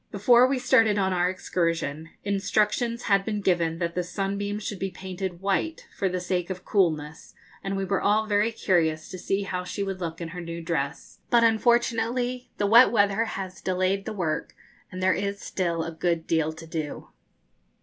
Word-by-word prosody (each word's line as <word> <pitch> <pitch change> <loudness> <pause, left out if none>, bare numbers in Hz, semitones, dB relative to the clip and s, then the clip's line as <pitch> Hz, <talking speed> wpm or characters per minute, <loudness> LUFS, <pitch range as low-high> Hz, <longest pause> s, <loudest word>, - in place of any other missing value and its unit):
Before 240 +5 +5
we 270 0 0
started 225 -4 +4
on 190 -1 +1
our 180 0 +2
excursion, 165 -4 -2
instructions 210 +4 0
had 200 -2 +3
been 210 0 -2
given 170 -4 +1
that 170 -1 -2
the 180 - 0
'Sunbeam' 200 +2 -2
should 205 -2 -5
be 195 - -2
painted 185 -1 -6
white, 200 +12 -1
for 195 - 0
the 180 0 -2
sake 180 0 -2
of 185 -1 -6
coolness, 160 -6 0 0.3
and 195 0 -2
we 195 - -1
were 195 0 0
all 215 +2 +3
very 210 +1 +2
curious 160 -7 0
to 185 - -7
see 195 +2 -1
how 180 -2 -3
she 180 +2 -4
would 195 -1 -4
look 165 -2 -4
in 170 -1 -5
her 180 +1 -7
new 170 0 -6
dress; 165 -3 -4
but 235 -1 +5
unfortunately 240 +2 +1
the 205 - +1
wet 230 +5 +7
weather 205 0 +3
has 190 -3 -6
delayed 185 +1 0
the - - -4
work, 175 -6 -2 0.4
and 185 0 -5
there 185 0 +4
is 200 0 -2
still 170 -5 -2
a 165 - -4
good 165 0 -1
deal 160 -1 +1
to 160 +1 -11
do. 160 -2 -5
190 Hz, 190 wpm, -26 LUFS, 170-210 Hz, 0.4 s, wet